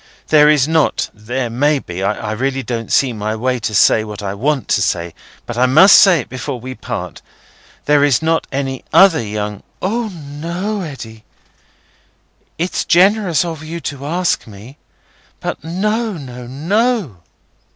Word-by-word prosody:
There 150 -1 +6
is 150 -2 +3
not—there 125 -6 -1
may 145 +5 +2
be—I 100 0 -3
really 135 +4 -2
don't 115 -1 -4
see 130 -3 +3
my 110 0 -3
way 125 +2 -1
to 110 0 +3
what 105 -1 -8
I 95 -1 -3
want 135 +6 -1
to - - +2
say, 85 -3 -1 0.3
but 120 0 -5
I 130 - +4
must 155 +10 +7
say 180 -6 +6
it - - -12
before 130 0 -5
we 130 +2 -7
part—there 145 +2 -4
is 145 -4 +3
not 165 0 0
any 135 -1 -3
other 190 -8 +6
young—" 105 -1 -4 0.2
"O 225 +5 -1
no, 170 +5 -5
Eddy! 115 -9 -8 1.3
It's 175 +3 -1
generous 185 -1 +3
of 165 -3 -5
you 165 +2 -6
to 140 -2 -6
ask 175 -2 -1
me; 110 +7 -13 0.6
but - - -5
no, 210 +7 -1
no, 125 -6 -9
no!" 180 - -1
140 Hz, 145 wpm, -17 LUFS, 115-170 Hz, 1.3 s, must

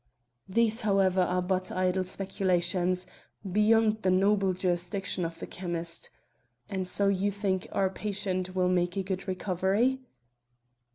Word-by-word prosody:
These, 225 +3 +2
however, 195 -3 +3
are 180 0 +1
but 185 0 -1
idle 185 0 +1
speculations, 180 -1 0 0.4
beyond 215 +2 +3
the 185 - +1
noble 195 +1 +3
jurisdiction 180 +1 -1
of 165 0 -5
the - - -6
chymist. 170 -2 -4 0.6
And 190 -3 -3
so 200 +2 +1
you 200 +1 +2
think 195 -2 -1
our 190 -1 +1
patient 190 -3 -3
will 185 -1 +2
make 180 0 +1
a 195 - 0
good 190 0 -4
recovery?" 190 +7 +1
190 Hz, 130 wpm, -29 LUFS, 180-200 Hz, 0.6 s, however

